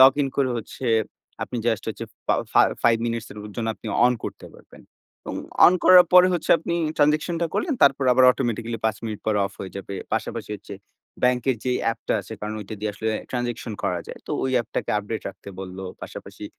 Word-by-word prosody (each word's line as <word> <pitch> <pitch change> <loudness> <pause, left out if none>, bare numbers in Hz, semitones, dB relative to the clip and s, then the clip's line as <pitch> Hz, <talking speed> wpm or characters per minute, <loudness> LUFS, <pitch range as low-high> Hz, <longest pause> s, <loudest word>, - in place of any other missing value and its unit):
Login 135 +1 +6
করে 135 -2 +2
হচ্ছে 115 +3 -7 0.6
আপনি 125 - -4
জাস্ট 110 -2 +1
হচ্ছে 110 +1 -4 0.2
ফা - - +3 0.2
ফা - - +6 0.2
5 115 -1 +5
মিনিটস 115 -1 -3
এর - - -15 0.2
জন্য 115 -1 -2
আপনি - - -12 0.2
অন 125 - +4
করতে - - -6
পারবেন। - - -16 0.4
এবং - - -6 0.3
অন 180 - +6
করার 180 -1 +9
পরে 180 0 +9
হচ্ছে 175 -3 -2
আপনি 170 - -3 0.2
ট্রান্সেকশন 155 +3 +2
টা 170 - +2
করলেন 315 -6 0
তারপর 140 -1 +5
আবার 130 +1 +5
অটোমেটিক্যালি 115 -2 -2
৫ 110 -1 0
মিনিট 110 -2 -4
পর 110 - +2
অফ 100 - -4
হয়ে 95 - -6
যাবে। 100 0 -6 0.2
পাশাপাশি - - -3
হচ্ছে 100 0 -10 0.5
ব্যাংকের 125 0 +2
যেই 125 -1 +1
অ্যাপ 115 0 0
টা - - +3
আছে 100 +3 -10
কারণ 105 +1 -4
ওইটা 105 +1 -7
দিয়ে 105 -1 -1
আসলে 110 +2 -3 0.2
ট্রান্সেকশন 120 -2 -3
করা 90 -1 0
যায়। - - -8
তো - - -8
ওই 130 - 0
অ্যাপটাকে 120 -1 -2
আপডেট 105 +2 -4
রাখতে 100 - -11
বললো। 95 0 -7 0.2
পাশাপাশি - - -9
115 Hz, 200 wpm, -24 LUFS, 105-135 Hz, 0.6 s, করার